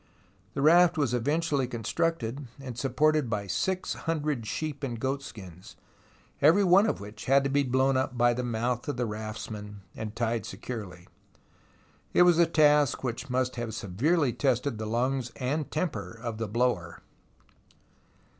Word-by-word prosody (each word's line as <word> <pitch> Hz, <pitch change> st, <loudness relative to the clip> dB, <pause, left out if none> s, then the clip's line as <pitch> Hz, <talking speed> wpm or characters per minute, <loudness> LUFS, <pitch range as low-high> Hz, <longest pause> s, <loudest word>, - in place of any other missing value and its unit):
The 140 Hz, -, -1 dB
raft 175 Hz, +2 st, +6 dB
was 140 Hz, -5 st, +1 dB
eventually 145 Hz, +2 st, 0 dB
constructed 130 Hz, +2 st, -2 dB
and 130 Hz, -3 st, -7 dB
supported 150 Hz, +2 st, +1 dB
by 105 Hz, -2 st, -2 dB
six 185 Hz, -, -1 dB
hundred 150 Hz, -8 st, -2 dB
sheep 150 Hz, +1 st, -4 dB
and 120 Hz, -4 st, -3 dB
goat 135 Hz, +3 st, -1 dB
skins, 95 Hz, -, -11 dB, 0.7 s
every 165 Hz, +8 st, +6 dB
one 195 Hz, +3 st, +5 dB
of -, -, -1 dB
which 105 Hz, +1 st, -9 dB
had 135 Hz, +1 st, +4 dB
to 140 Hz, -, -1 dB
be 145 Hz, +1 st, +3 dB
blown 130 Hz, 0 st, +2 dB
up 130 Hz, -1 st, -1 dB
by 120 Hz, 0 st, +4 dB
the 125 Hz, -, -2 dB
mouth 120 Hz, 0 st, -2 dB
of 145 Hz, -, -2 dB
the 125 Hz, -, 0 dB
raftsman 105 Hz, -1 st, -6 dB
and 110 Hz, -1 st, -6 dB
tied 115 Hz, -2 st, -1 dB
securely. 95 Hz, -8 st, -7 dB, 1.1 s
It -, -, +7 dB
was 175 Hz, -2 st, +5 dB
a 170 Hz, -, +6 dB
task 150 Hz, -4 st, +3 dB
which 125 Hz, +1 st, -4 dB
must 125 Hz, 0 st, -1 dB
have 115 Hz, -2 st, -4 dB
severely 125 Hz, -, +1 dB
tested 125 Hz, -2 st, 0 dB
the 110 Hz, -, -3 dB
lungs 125 Hz, +2 st, -1 dB
and 145 Hz, +4 st, -2 dB
temper 145 Hz, -, -3 dB
of 115 Hz, -2 st, -5 dB
the 115 Hz, -, -2 dB
blower. 105 Hz, -6 st, -1 dB
125 Hz, 155 wpm, -28 LUFS, 115-150 Hz, 1.1 s, It